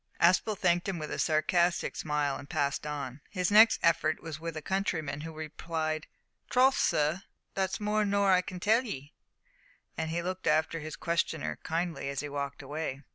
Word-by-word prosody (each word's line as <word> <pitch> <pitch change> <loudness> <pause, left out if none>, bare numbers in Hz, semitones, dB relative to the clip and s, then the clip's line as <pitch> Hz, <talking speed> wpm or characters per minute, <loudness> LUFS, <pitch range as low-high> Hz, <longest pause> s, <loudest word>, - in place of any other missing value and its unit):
Aspel 185 +4 +4
thanked 175 +1 +2
him 190 - -2
with 155 -2 -5
a - - -3
sarcastic 170 +3 +2
smile 150 -2 -1
and 145 - -11
passed 140 +1 -1
on. 140 -2 -5
His 185 -1 -1
next 220 +2 +7
effort 155 -2 +3
was 160 -2 -7
with 165 -1 -5
a - - -4
countryman, 160 -6 -1
who 165 +1 -6
replied, 155 0 -3 0.4
"Troth, 260 +2 +5
sur, 155 +4 +2 0.3
that's 190 0 -1
more 210 0 +1
nor 200 -1 +3
I 180 -1 +5
can 185 0 -7
tell 220 +6 +3
'ee," 145 - -7 0.8
and 160 0 -2
looked 185 0 -4
after 155 +1 +2
his 155 0 -6
questioner 170 -2 -1
kindly 165 -3 -2
as 140 -1 -3
he 150 - -5
walked 140 0 -4
away. 145 -1 -4
160 Hz, 175 wpm, -30 LUFS, 150-185 Hz, 0.8 s, next